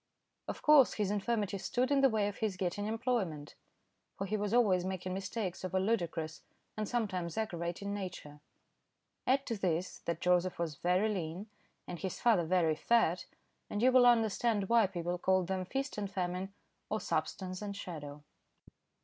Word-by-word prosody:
Of - - -5
course 300 -4 +7
his 205 -2 0
infirmity 205 -1 -1
stood 250 +7 0
in 280 -1 +4
the 270 - +6
way 215 -3 +1
of 205 - -5
his 215 -4 -1
getting 190 +3 -2
employment, 215 - -2 0.6
for 195 - -2
he 205 +2 -1
was 205 -1 -1
always 205 -7 +4
making 185 0 -3
mistakes 190 0 -4
of 185 0 -3
a - - +4
ludicrous 170 -6 -1 0.3
and 215 -1 -3
sometimes 190 -8 -2
aggravating 180 -1 -3
nature. 180 -7 -6 0.9
Add 270 +2 +3
to 230 - -2
this 180 -2 -1
that 170 -1 -2
Joseph 180 0 +2
was 170 -3 -2
very 180 +7 +1
lean 190 0 -4 0.4
and 175 - -6
his 190 -2 -4
father 215 -8 +3
very 165 -2 +3
fat, 180 -2 +2 0.4
and 205 - -2
you 255 - +6
will 250 -1 +7
understand 225 -3 +2
why 230 -3 +5
people 175 -1 -3
called 185 0 +2
them 185 0 -2
"Feast 270 +3 -3
and 200 -1 -3
Famine," 185 0 -2 0.4
or - - 0
"Substance 185 0 -2
and 200 -1 -5
Shadow." 150 -6 -7
190 Hz, 165 wpm, -33 LUFS, 175-220 Hz, 0.9 s, course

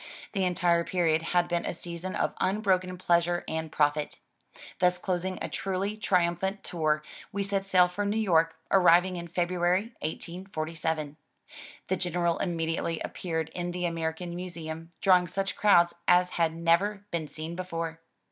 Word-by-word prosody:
The 195 -3 0
entire 175 -1 +2
period 165 -3 +1
had 175 +1 +1
been 175 -1 0
a - - -3
season 175 +2 -5
of - - 0
unbroken 185 -2 +1
pleasure 175 -1 +2
and 160 0 -3
profit. 145 0 +1 0.6
Thus 180 0 +3
closing 185 0 -2
a - - -1
truly 195 +2 -2
triimiphant 190 -1 0
tour, 155 -3 0 0.3
we 200 0 -1
set 195 -1 -1
sail 185 -2 +5
for 180 +3 -3
New 205 +2 0
York, 165 -6 +3 0.2
arriving 180 -1 +5
in 170 0 -6
February, 180 +5 0
1847. 160 -2 -4 0.7
The 190 - 0
General 175 -1 0
immediately 165 -2 -1
appeared 160 -3 -3
in 175 +1 -4
the 180 0 -2
American 165 +1 -3
Museum, 165 -2 -6
drawing 180 -2 +5
such 195 +3 -2
crowds 175 -5 +5
as 180 0 +5
had 165 -1 +1
never 190 +5 +1
been 165 -3 -2
seen 160 +3 -6
before. 165 -3 -4
175 Hz, 145 wpm, -28 LUFS, 165-185 Hz, 0.7 s, sail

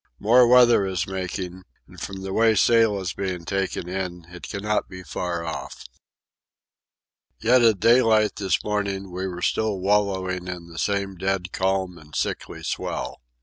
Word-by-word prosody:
More 120 +4 +5
weather 120 -3 +6
is 95 -2 -1
making, 95 -1 -5 0.3
and - - -14
from 95 -1 -6
the 95 0 -4
way 115 +1 +4
sail 115 0 +4
is 90 -2 -3
being 95 -3 -4
taken 95 -1 -2
in 90 -2 -4
it 90 - -9
cannot 105 +1 -1
be 95 0 -9
far 85 -2 -4
off. 80 - -6 1.5
Yet 125 +2 +4
at 110 -4 +4
daylight 115 -3 +4
this 95 -2 0
morning 100 -2 -2
we 95 +2 -3
were 90 -1 -6
still 110 -2 0
wallowing 95 -2 0
in 90 -2 -6
the 80 -1 -8
same 100 -1 -1
dead 95 0 -2
calm 95 -2 -1
and 75 -1 -14
sickly - - -3
swell. 65 +1 -4
95 Hz, 155 wpm, -24 LUFS, 90-105 Hz, 1.5 s, weather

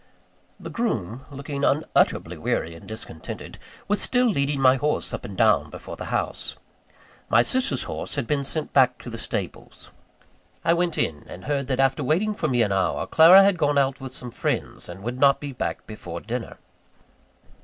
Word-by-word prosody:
The 165 - -8
groom, 130 - -2
looking 140 0 -5
unutterably 150 +3 +1
weary 85 - -2
and 85 - -13
discontented, 110 -7 -7 0.3
was 205 +1 +2
still 250 0 +2
leading 140 - +1
my 130 0 +5
horse 150 +3 -1
up - - -5
and - - -8
down - - +3
before - - -8
the - - -7
house. - - -2 0.7
My - - +5
sister's 255 - 0
horse - - -5
had 140 -4 -1
been 140 +2 0
sent 155 +3 -3
back 125 -2 +4
to 120 - -7
the 115 - -6
stables. - - -6 0.7
I 165 - +5
went 170 -1 0
in; 75 -2 -1
and 90 - -10
heard 140 -2 -1
that, 130 -1 -1
after 135 +2 +2
waiting 180 +11 +1
for 205 - -2
me 120 -4 +2
an 105 - -1
hour, 75 -7 0
Clara 175 +5 +8
had 195 -3 +3
gone 145 -2 +2
out 135 -1 +1
with 130 -1 -6
some 125 -2 -5
friends, - - -3
and 90 +3 -9
would 120 +3 -4
not 140 0 +5
be 145 -1 -6
back 125 - -4
before 85 -6 -7
dinner. 120 +4 -5
135 Hz, 185 wpm, -24 LUFS, 120-155 Hz, 0.7 s, Clara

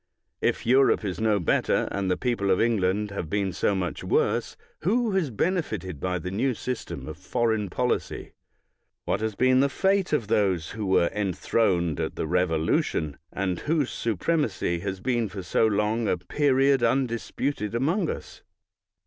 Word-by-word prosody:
If - - 0
Europe 130 -2 +4
is 90 -2 -3
no 110 -2 +2
better, 85 - +1
and 100 -1 -1
the 90 - +1
people 120 -6 -1
of 95 - +3
England 105 -2 +1
have 90 -5 -4
been 100 0 -1
so 100 - +1
much 90 -2 -3
worse, - - 0 0.2
who 225 +6 +1
has 190 -7 +1
benefited 115 - -2
by 90 +2 -1
the 90 +2 -5
new 125 +6 0
system 125 +2 -5
of - - -7
foreign 110 -4 0
policy? 125 +6 -2 0.7
What 100 - 0
has 110 -2 -2
been 130 +2 +4
the 140 +1 +3
fate 195 +5 +1
of 150 -8 +1
those 95 -6 +1
who 110 -3 -4
were 90 -2 +3
enthroned 95 -4 0
at - - -2
the - - -2
Revolution, 80 -3 0
and 95 -2 -2
whose 150 -4 0
supremacy 115 - -1
has 95 +1 -4
been 120 -3 0
for 95 -1 -7
so 110 - +2
long 110 +2 0
a 90 - +1
period 135 +7 +2
undisputed 120 -1 -1
among 165 - +1
us? - - -7
105 Hz, 160 wpm, -26 LUFS, 95-130 Hz, 0.7 s, Europe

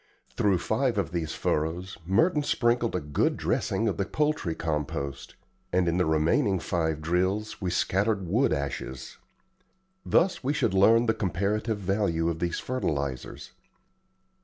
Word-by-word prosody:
Through 100 -3 +2
five 115 +5 0
of 100 -5 -1
these 85 -3 -3
furrows 85 +5 -2
Merton 150 - +3
sprinkled 120 -5 +1
a - - +1
good 75 -2 0
dressing 115 - 0
of 100 - -1
the 100 - 0
poultry 150 - -1
compost, 70 -3 -3 0.4
and 90 -1 +2
in 85 +1 +1
the 90 - +2
remaining 80 +5 +2
five 80 -3 -1
drills 95 +7 -1
we 95 - -1
scattered 95 +2 0
wood 115 +10 +2
ashes. 70 -3 -4 0.8
Thus 185 -3 +2
we 140 +3 +1
should 140 -9 0
learn 115 +5 +5
the 110 - +2
comparative 105 +3 -1
value 95 -4 0
of 80 - -6
these 85 0 -1
fertilizers. 70 - -3
95 Hz, 140 wpm, -27 LUFS, 80-110 Hz, 0.8 s, learn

